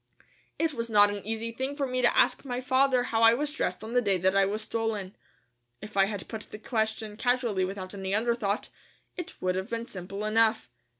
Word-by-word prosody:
It 325 Hz, -2 st, 0 dB
was 230 Hz, -2 st, -3 dB
not 205 Hz, -2 st, +6 dB
an 205 Hz, -1 st, -5 dB
easy 225 Hz, +1 st, -3 dB
thing 265 Hz, +4 st, -3 dB
for 285 Hz, -1 st, -1 dB
me 255 Hz, -1 st, -1 dB
to 240 Hz, -, +3 dB
ask -, -, +3 dB
my 250 Hz, -3 st, -3 dB
father 260 Hz, 0 st, +3 dB
how 225 Hz, -2 st, 0 dB
I 230 Hz, 0 st, +7 dB
was 295 Hz, +3 st, -1 dB
dressed 310 Hz, -, -2 dB
on 225 Hz, +2 st, -6 dB
the 245 Hz, -, +4 dB
day 200 Hz, -4 st, +2 dB
that 190 Hz, +2 st, +2 dB
I 195 Hz, 0 st, +4 dB
was 210 Hz, +2 st, -3 dB
stolen. 215 Hz, -4 st, -3 dB, 0.6 s
If 215 Hz, 0 st, -10 dB
I 195 Hz, -1 st, +5 dB
had 200 Hz, -3 st, -5 dB
put 220 Hz, -2 st, -6 dB
the -, -, -8 dB
question 220 Hz, -1 st, -2 dB
casually 240 Hz, -6 st, +1 dB
without 185 Hz, 0 st, -6 dB
any 190 Hz, -1 st, -4 dB
underthought, 220 Hz, -2 st, 0 dB, 0.5 s
it 360 Hz, 0 st, -7 dB
would 185 Hz, 0 st, +2 dB
have 190 Hz, +1 st, -3 dB
been 230 Hz, 0 st, -3 dB
simple 195 Hz, -1 st, -6 dB
enough. 220 Hz, -, +2 dB
220 Hz, 215 wpm, -28 LUFS, 200-245 Hz, 0.6 s, I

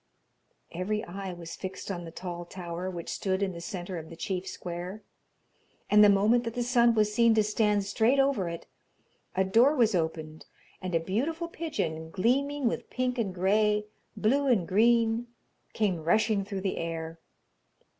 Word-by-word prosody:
Every 205 Hz, +5 st, -2 dB
eye 190 Hz, +2 st, -6 dB
was 170 Hz, -2 st, -8 dB
fixed 190 Hz, +1 st, -6 dB
on 175 Hz, -2 st, -5 dB
the 165 Hz, -, -8 dB
tall 175 Hz, 0 st, -6 dB
tower 175 Hz, 0 st, -5 dB
which 175 Hz, -2 st, -6 dB
stood 190 Hz, 0 st, -1 dB
in 195 Hz, -, 0 dB
the 170 Hz, -1 st, -8 dB
centre 180 Hz, 0 st, -5 dB
of 160 Hz, 0 st, -10 dB
the 165 Hz, -, -9 dB
chief 185 Hz, +2 st, -3 dB
square, 180 Hz, +4 st, -6 dB, 0.9 s
and 210 Hz, 0 st, +8 dB
the 210 Hz, -, +8 dB
moment 210 Hz, +5 st, +4 dB
that 230 Hz, 0 st, -4 dB
the 245 Hz, -, 0 dB
sun 235 Hz, -1 st, +4 dB
was 210 Hz, -1 st, +2 dB
seen 230 Hz, 0 st, +4 dB
to 215 Hz, -, +4 dB
stand 210 Hz, -1 st, +1 dB
straight 225 Hz, +6 st, +2 dB
over 270 Hz, -10 st, +2 dB
it, 170 Hz, 0 st, -7 dB, 0.7 s
a 190 Hz, -, +3 dB
door 230 Hz, +10 st, +4 dB
was 235 Hz, -6 st, +3 dB
opened 160 Hz, -2 st, -3 dB, 0.3 s
and 185 Hz, -2 st, -3 dB
a -, -, +4 dB
beautiful 275 Hz, -, -2 dB
pigeon, 230 Hz, -, -4 dB
gleaming 265 Hz, -, +1 dB
with -, -, -3 dB
pink 255 Hz, -1 st, -1 dB
and 195 Hz, -5 st, -2 dB
grey, 210 Hz, +3 st, +2 dB, 0.3 s
blue 275 Hz, +6 st, +2 dB
and 210 Hz, -10 st, +2 dB
green, 230 Hz, +3 st, +3 dB, 0.5 s
came 185 Hz, -7 st, 0 dB
rushing 210 Hz, +4 st, +2 dB
through 195 Hz, -1 st, -5 dB
the 190 Hz, -1 st, -2 dB
air. 165 Hz, 0 st, -4 dB
200 Hz, 170 wpm, -28 LUFS, 175-230 Hz, 0.9 s, and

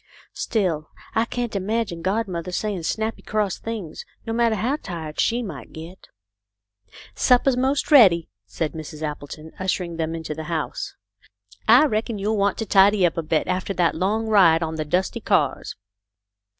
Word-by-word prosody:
" -, -, -26 dB
Still 175 Hz, -9 st, -1 dB, 0.2 s
I 225 Hz, +1 st, +2 dB
can't 240 Hz, -2 st, -4 dB
imagine 200 Hz, -3 st, -2 dB
godmother 185 Hz, -2 st, -2 dB
saying 200 Hz, 0 st, -2 dB
snappy 220 Hz, +7 st, -2 dB
cross 210 Hz, -3 st, -1 dB
things, 215 Hz, -8 st, -6 dB, 0.2 s
no 225 Hz, -, -3 dB
matter 230 Hz, -1 st, +2 dB
how 245 Hz, +8 st, 0 dB
tired 165 Hz, -, -7 dB
she 240 Hz, +1 st, +1 dB
might 165 Hz, -11 st, -8 dB
get." 165 Hz, +4 st, -10 dB, 0.6 s
" 100 Hz, 0 st, -46 dB, 0.2 s
Supper's 250 Hz, +1 st, +3 dB
most 265 Hz, +4 st, 0 dB
ready," 190 Hz, -, +7 dB, 0.2 s
said 105 Hz, +10 st, -3 dB
Mrs. 155 Hz, -1 st, -8 dB
Appleton, 155 Hz, +1 st, -6 dB
usher 185 Hz, 0 st, 0 dB
ing 170 Hz, -1 st, -7 dB
them 165 Hz, 0 st, -2 dB
into 160 Hz, -2 st, -5 dB
the 160 Hz, +1 st, -7 dB
house. 160 Hz, -2 st, -4 dB, 0.4 s
" 100 Hz, -, -63 dB, 0.3 s
I 245 Hz, +7 st, +7 dB
reckon 220 Hz, -4 st, -1 dB
you'll 210 Hz, +2 st, -1 dB
want 200 Hz, 0 st, +1 dB
to 225 Hz, -, -2 dB
tidy 195 Hz, -1 st, +5 dB
up 170 Hz, -, +1 dB
a 165 Hz, -, -1 dB
bit 155 Hz, 0 st, 0 dB
after 185 Hz, +1 st, -2 dB
that 175 Hz, -2 st, +2 dB
long 205 Hz, +6 st, 0 dB
ride 180 Hz, -7 st, +5 dB
on 160 Hz, 0 st, -3 dB
the 155 Hz, -1 st, -3 dB
dusty 180 Hz, +5 st, 0 dB
cars. -, -, 0 dB
185 Hz, 175 wpm, -23 LUFS, 160-220 Hz, 0.6 s, ready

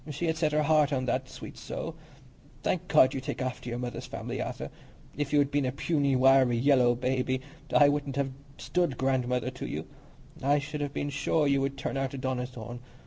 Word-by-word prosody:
She 150 Hz, +4 st, -3 dB
had 160 Hz, -1 st, +1 dB
set 160 Hz, -2 st, +1 dB
her 150 Hz, 0 st, +2 dB
heart 150 Hz, -1 st, +4 dB
on 130 Hz, -2 st, 0 dB
that, -, -, -1 dB
sweet -, -, -9 dB
soul! 165 Hz, -, -5 dB, 0.7 s
Thank 180 Hz, -, -1 dB
God 130 Hz, 0 st, +5 dB
you 135 Hz, -, -3 dB
take -, -, -4 dB
after 125 Hz, -1 st, -3 dB
your 120 Hz, -, -3 dB
mother's 125 Hz, -1 st, -5 dB
family, -, -, -4 dB
Arthur. -, -, -5 dB, 0.4 s
If 145 Hz, -1 st, -2 dB
you 150 Hz, -, +3 dB
had 140 Hz, -1 st, +3 dB
been 145 Hz, -2 st, +1 dB
a -, -, 0 dB
puny, 140 Hz, 0 st, +1 dB
wiry, 130 Hz, -2 st, +5 dB
yellow 125 Hz, -1 st, +4 dB
baby, 130 Hz, +1 st, 0 dB, 0.3 s
I 145 Hz, -, +7 dB
wouldn't 145 Hz, -1 st, -1 dB
have 140 Hz, -1 st, 0 dB, 0.3 s
stood 175 Hz, -8 st, 0 dB
godmother 125 Hz, -2 st, 0 dB
to -, -, -6 dB
you. -, -, -4 dB, 0.6 s
I 140 Hz, +2 st, +3 dB
should 145 Hz, +1 st, -4 dB
have 145 Hz, -1 st, -2 dB
been 145 Hz, +1 st, -3 dB
sure 150 Hz, +2 st, +1 dB
you 140 Hz, -1 st, +3 dB
would 135 Hz, 0 st, -2 dB
turn 135 Hz, -, -3 dB
out 135 Hz, 0 st, -2 dB
a -, -, -5 dB
Donnithorne. 125 Hz, -2 st, -4 dB
135 Hz, 205 wpm, -29 LUFS, 130-145 Hz, 0.7 s, I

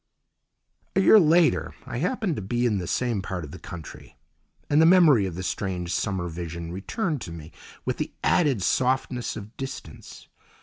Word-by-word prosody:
A -, -, +4 dB
year 210 Hz, +3 st, +7 dB
later 165 Hz, -1 st, +3 dB
I 125 Hz, -2 st, -5 dB
happened 185 Hz, -, -1 dB
to -, -, -4 dB
be 120 Hz, +6 st, -1 dB
in 105 Hz, -5 st, +1 dB
the 90 Hz, -, -5 dB
same 120 Hz, +1 st, 0 dB
part 95 Hz, -2 st, -4 dB
of 75 Hz, -, -9 dB
the -, -, -9 dB
country, 80 Hz, -4 st, -10 dB, 0.5 s
and 145 Hz, +2 st, +4 dB
the -, -, +6 dB
memory 160 Hz, -, +6 dB
of 90 Hz, -, -6 dB
the 95 Hz, -, -5 dB
strange 90 Hz, -2 st, -3 dB
summer 95 Hz, -4 st, -1 dB
vision 85 Hz, 0 st, -6 dB
returned 150 Hz, -, -3 dB
to 85 Hz, -, -7 dB
me 80 Hz, -1 st, -9 dB, 0.3 s
with -, -, -1 dB
the -, -, -3 dB
added 140 Hz, -, +2 dB
softness 130 Hz, -1 st, 0 dB
of 110 Hz, +1 st, -9 dB
distance. 130 Hz, -, -8 dB
110 Hz, 175 wpm, -25 LUFS, 90-145 Hz, 0.5 s, year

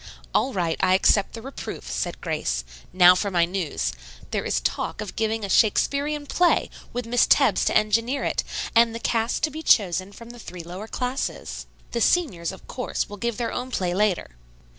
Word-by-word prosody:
"All 270 Hz, -, +2 dB
right; 175 Hz, -6 st, -1 dB
I 185 Hz, -, +4 dB
accept 195 Hz, +1 st, +3 dB
the 225 Hz, -, -8 dB
reproof," 270 Hz, -, -7 dB
said 60 Hz, -, -3 dB
Grace. -, -, -2 dB, 0.3 s
"Now 180 Hz, 0 st, +8 dB
for 200 Hz, +3 st, -1 dB
my 175 Hz, -3 st, +3 dB
news. 170 Hz, -, -2 dB, 0.4 s
There -, -, -1 dB
is -, -, 0 dB
talk -, -, -2 dB
of 205 Hz, -, -6 dB
giving 220 Hz, -1 st, -1 dB
a -, -, -4 dB
Shakespearian 280 Hz, +9 st, +2 dB
play, 350 Hz, +5 st, +2 dB, 0.2 s
with 245 Hz, -1 st, -4 dB
Miss 240 Hz, +1 st, +3 dB
Tebbs -, -, +4 dB
to -, -, +3 dB
engineer 230 Hz, +6 st, +1 dB
it, -, -, 0 dB, 0.3 s
and 230 Hz, 0 st, +5 dB
the -, -, -4 dB
cast 230 Hz, 0 st, 0 dB
to 310 Hz, -, +2 dB
be 315 Hz, +2 st, -6 dB
chosen 190 Hz, -, +3 dB
from 230 Hz, +3 st, -11 dB
the 240 Hz, -, -12 dB
three 180 Hz, -5 st, -8 dB
lower 180 Hz, +6 st, -8 dB
classes. 250 Hz, +3 st, -4 dB, 0.2 s
The 235 Hz, -, -2 dB
seniors, 220 Hz, -, +1 dB
of 190 Hz, -, -13 dB
course, 250 Hz, -, -3 dB
will 205 Hz, -, -8 dB
give 235 Hz, +1 st, -2 dB
their 235 Hz, -1 st, -2 dB
own 250 Hz, +1 st, -4 dB
play 180 Hz, -8 st, -1 dB
later." 195 Hz, -, 0 dB
215 Hz, 190 wpm, -24 LUFS, 185-245 Hz, 0.4 s, Now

